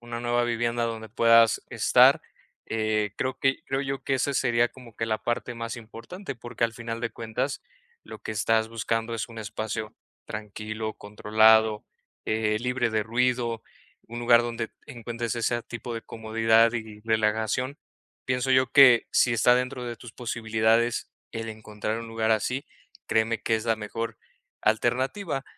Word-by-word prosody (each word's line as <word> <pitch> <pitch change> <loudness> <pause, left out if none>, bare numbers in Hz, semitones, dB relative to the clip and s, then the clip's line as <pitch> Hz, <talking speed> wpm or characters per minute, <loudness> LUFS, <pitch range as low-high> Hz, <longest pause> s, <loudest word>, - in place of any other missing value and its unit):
una 120 0 -6
nueva 120 0 +1
vivienda 120 0 0
donde 110 -1 -4
puedas 115 0 +5
estar, - - +5 0.5
eh, 110 -2 0
creo 130 0 -2
que 135 0 +1
creo 135 0 -1
yo 135 -1 -4
que, 135 - -1
esa 140 +2 -1
sería 120 -1 +2
como 120 -4 -15
que 115 - -3
la 110 - 0
parte 120 0 -2
más 115 +1 -5
importante, 120 - -8
porque 120 0 -3
al 115 -1 -2
final 115 -1 -5
de 115 - -1
cuentas 115 +5 -4 0.4
lo - - -10
que 110 - -6
estás 110 +1 +1
buscando 115 0 -2
es 115 +1 -4
un 115 - -9
espacio 110 0 -4 0.3
tranquilo, 110 +1 -5
controlado, 110 +1 +3 0.4
eh, 110 -1 +1
libre 125 -1 0
de 110 -1 +1
ruido, 120 0 0 0.4
un 120 +1 -7
lugar 120 0 +5
donde 115 -1 -4 0.2
encuentres 120 -3 -4
ese 120 0 -1
tipo 115 0 -7
de 115 - -5
comodidad 115 +1 +2
y 110 -2 -6
relajación, 110 +4 0 0.5
pienso 130 +1 0
yo 130 0 +4
que 125 -5 +7
si 120 - +3
está 120 +2 +5
dentro 125 0 -2
de 120 -1 -5
tus 120 -1 -12
posibilidades 115 0 0 0.2
el 115 0 -5
encontrar 110 0 -4
un 115 - -7
lugar 115 0 -1
así, 125 +5 0 0.4
créeme 110 0 +1
que 115 - +1
es 110 0 -2
la 115 -1 +1
mejor 115 +1 -5 0.4
alternativa, 130 - 0
115 Hz, 160 wpm, -26 LUFS, 110-120 Hz, 0.5 s, que